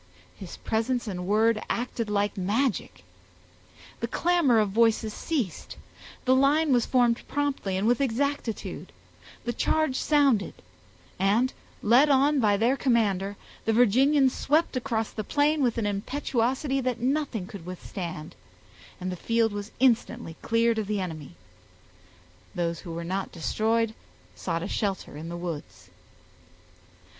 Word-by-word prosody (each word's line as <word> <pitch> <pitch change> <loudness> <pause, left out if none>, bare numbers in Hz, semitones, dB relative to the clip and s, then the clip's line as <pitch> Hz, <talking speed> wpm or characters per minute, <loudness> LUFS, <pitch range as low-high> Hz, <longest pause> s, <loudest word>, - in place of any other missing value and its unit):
His 190 -3 -9
presence 235 +3 -1
and 180 -3 -4
word 215 +2 +3
acted 235 -2 -2
like 205 0 0
magic. 210 +6 -1 1.0
The - - -2
clamor 340 -9 +2
of 210 -2 +2
voices 225 0 +2
ceased; 250 - -3 0.5
the 260 - +4
line 285 +2 +3
was 240 -2 +2
formed 240 -2 +3
promptly 275 -10 -1
and 195 - -1
with 240 +3 +3
exactitude; 235 - -2 0.5
the 240 - -1
charge 310 +3 +1
sounded; 280 -9 +2 0.6
and, 215 +7 +2 0.3
led 245 +7 +5
on 280 +1 +4
by 205 -4 +3
their 235 +5 +2
commander, 205 -7 +1 0.3
the 225 - +2
Virginians 260 +4 +4
swept 310 +1 +1
across 235 -4 -1
the 215 - -4
plain 295 +6 +1
with 245 -4 +1
an 225 - 0
impetuosity 260 +5 -1
that 250 -2 -2
nothing 260 -5 -1
could 185 -3 -10
withstand, 175 -3 -6 0.7
and 185 0 -3
the - - -3
field 230 +3 +1
was 205 +1 -5
instantly 235 -7 +1
cleared 230 0 +2
of 210 - -3
the 210 -1 -1
enemy; 155 - -6 1.2
those 170 -1 -1
who 170 - -8
were 170 +1 -4
not 190 +3 -3
destroyed 220 +6 0 0.4
sought 165 - -3
a - - -3
shelter 195 -7 -3
in 160 +3 -7
the 170 - -5
woods. 170 -4 -7
225 Hz, 135 wpm, -27 LUFS, 195-260 Hz, 1.2 s, led